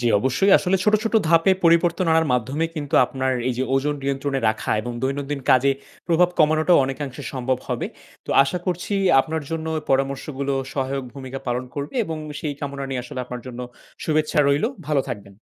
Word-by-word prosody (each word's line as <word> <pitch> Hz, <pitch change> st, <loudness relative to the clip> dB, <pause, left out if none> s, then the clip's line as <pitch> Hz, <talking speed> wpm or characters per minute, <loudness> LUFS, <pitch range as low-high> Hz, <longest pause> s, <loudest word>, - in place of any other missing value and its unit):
জ্বি। 120 Hz, -, +2 dB
অবশ্যই। 135 Hz, -, +2 dB
আসলে 190 Hz, +1 st, +1 dB
ছোট, 210 Hz, -, +4 dB
ছোট 225 Hz, -, -2 dB
ধাপে 165 Hz, +3 st, +5 dB
পরিবর্তন 170 Hz, +1 st, +4 dB
আনার 160 Hz, 0 st, +3 dB
মাধ্যমে 130 Hz, +6 st, 0 dB
কিন্তু 145 Hz, -3 st, -4 dB
আপনার 130 Hz, +1 st, -1 dB, 0.2 s
এই -, -, +1 dB
যে -, -, +1 dB
ওজন 145 Hz, +2 st, +1 dB
নিয়ন্ত্রণে 135 Hz, 0 st, -1 dB
রাখা 110 Hz, -, -2 dB
এবং 120 Hz, +2 st, -5 dB
দৈনন্দিন 140 Hz, +1 st, -2 dB
কাজে 135 Hz, +2 st, +5 dB, 0.4 s
প্রভাব 175 Hz, 0 st, +4 dB
কমানোটাও 155 Hz, 0 st, +4 dB
অনেকাংশে 135 Hz, -1 st, -5 dB
সম্ভব 130 Hz, -1 st, -1 dB
হবে। -, -, -1 dB, 0.4 s
তো -, -, -4 dB
আশা 140 Hz, +6 st, -2 dB
করছি 180 Hz, +2 st, -2 dB, 0.3 s
আপনার 160 Hz, +2 st, -3 dB
জন্য 160 Hz, -1 st, -3 dB
এ -, -, -7 dB
পরামর্শগুলো 135 Hz, +1 st, 0 dB, 0.2 s
সহায়ক 135 Hz, 0 st, -2 dB
ভূমিকা 135 Hz, -1 st, -6 dB
পালন 125 Hz, +1 st, -1 dB
করবে 145 Hz, -, -5 dB
এবং 160 Hz, -4 st, -4 dB, 0.2 s
সেই 150 Hz, -2 st, -3 dB
কামনা 140 Hz, -1 st, -4 dB
নিয়ে 130 Hz, -2 st, -3 dB
আসলে 130 Hz, -, -6 dB
আপনার 125 Hz, 0 st, -7 dB
জন্য 125 Hz, 0 st, -7 dB, 0.4 s
শুভেচ্ছা 155 Hz, -1 st, +1 dB
রইলো। 145 Hz, +10 st, +2 dB, 0.2 s
ভালো 150 Hz, -3 st, +2 dB
থাকবেন। 100 Hz, -3 st, -8 dB
140 Hz, 180 wpm, -23 LUFS, 130-160 Hz, 0.4 s, ধাপে